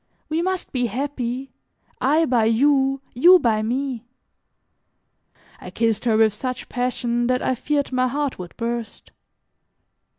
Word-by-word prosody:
We 315 +2 0
must 375 +1 -2
be 250 -2 0
happy, 260 +1 -4 0.5
I 305 +5 +3
by 245 -6 +2
you, 270 +3 +2
you 350 +10 +7
by 230 -9 +1
me." 250 +1 -2 1.6
I - - -9
kissed 225 -1 -1
her 225 -2 +3
with 220 -2 +4
such 255 +3 -5
passion 240 -1 -1
that 255 0 0
I - - +1
feared 285 +3 -1
my 255 0 +1
heart 280 -1 -2
would 180 -1 -9
burst. 235 -1 -5
250 Hz, 135 wpm, -22 LUFS, 235-275 Hz, 1.6 s, you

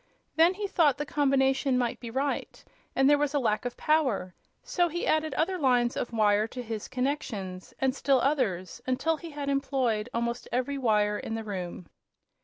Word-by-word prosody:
Then 335 +3 +5
he 410 +1 -3
thought 325 -8 +3
the 295 - -3
combination 270 -2 +2
might 245 -2 -1
be 235 - -7
right 270 +4 -3 0.3
and 270 - +4
there 290 0 +5
was 295 0 0
a - - +3
lack 225 -2 0
of 245 - -4
power; 260 - +1 0.3
so 350 -2 +1
he 345 +2 -3
added 310 -2 +1
other 360 +4 0
lines 245 -4 +2
of 240 - -3
wire 215 -1 +3
to 250 +2 -7
his 220 -2 -5
connections, 245 -9 -3
and 265 -1 +1
still 275 -1 +2
others, 230 - -1
until 315 +5 +1
he 335 +3 -9
had 290 -2 -5
employed 260 -5 0
almost 235 0 -2
every 255 +3 -1
wire 210 -4 +2
in 225 - -4
the 225 - -4
room. 185 -4 -5
260 Hz, 185 wpm, -28 LUFS, 225-290 Hz, 0.3 s, Then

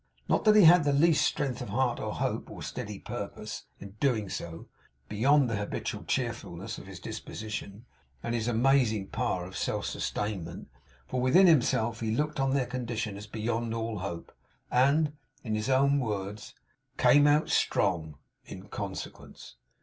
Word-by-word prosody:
Not - - +1
that 215 0 +6
he 210 - +8
had 170 0 +8
the 145 -1 +2
least 155 +1 +4
strength 135 -4 -1
of 125 - -5
heart 130 -2 0
or - - -3
hope, - - -2
or - - -8
steady - - -5
purpose - - -6
in 100 - -9
so 100 - -19
doing, 105 -10 -2 0.4
beyond 135 +6 +3
the 115 -2 -1
habitual 105 0 -4
cheerfulness - - -3
of - - -12
his - - -9
disposition, 110 0 -6 0.4
and 120 - -2
his 115 -1 -1
amazing 120 -4 +2
power 115 -7 -1
of 95 - -10
self - - -2
sustainment; 95 -6 -4 0.4
for 125 - -2
within 135 +10 +6
himself, 120 -8 +3
he 115 - -2
looked 150 +2 -1
on 135 0 +2
their 135 -2 +1
condition 120 -4 -3
as 105 +1 -9
beyond 115 +1 -2
all 115 -2 -3
hope, 85 -2 -6 0.4
and, 145 +4 +3 0.3
in 110 - -3
his 110 +4 -1
own 140 +2 +4
words, 105 -3 -4 0.4
'came 145 0 +6
out 150 +2 +3
strong' 80 -6 +1 0.3
in 95 +2 -10
consequence. 95 -10 -7
115 Hz, 160 wpm, -29 LUFS, 105-140 Hz, 0.4 s, he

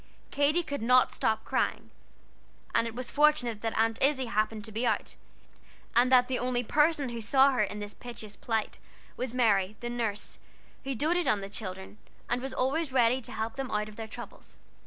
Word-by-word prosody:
Katy 295 +5 +2
could 285 -5 -4
not 250 +2 +4
stop 220 0 0
crying, - - -1 0.8
and 230 - +2
it 230 - -7
was 250 -1 -4
fortunate 285 -7 +2
that 225 -1 -2
Aunt 225 0 +1
Izzie 270 -1 +3
happened 215 -1 -1
to 220 - -9
be 225 +3 -2
out, 220 - -1 0.8
and 245 +2 +4
that 250 -1 +6
the 255 -1 -1
only 250 -1 0
person 295 +1 +2
who 235 -1 -5
saw 265 +5 +5
her 255 - +1
in 205 0 -1
this 205 0 -6
piteous 220 -4 -9
plight 225 -2 -2 0.4
was 255 -2 -3
Mary, 215 -5 +2
the 240 0 -4
nurse, 225 -4 -3 0.5
who 270 -1 -2
doted 320 +5 +1
on 210 -6 +2
the 195 - -6
children, 190 -1 -7 0.3
and 245 +1 0
was 270 +1 -4
always 270 +4 0
ready 250 0 +3
to - - -9
help 225 +2 -4
them 270 -2 -3
out 210 -2 -1
of 215 - -13
their 225 0 -6
troubles. 235 +2 -10
240 Hz, 195 wpm, -29 LUFS, 220-265 Hz, 0.8 s, that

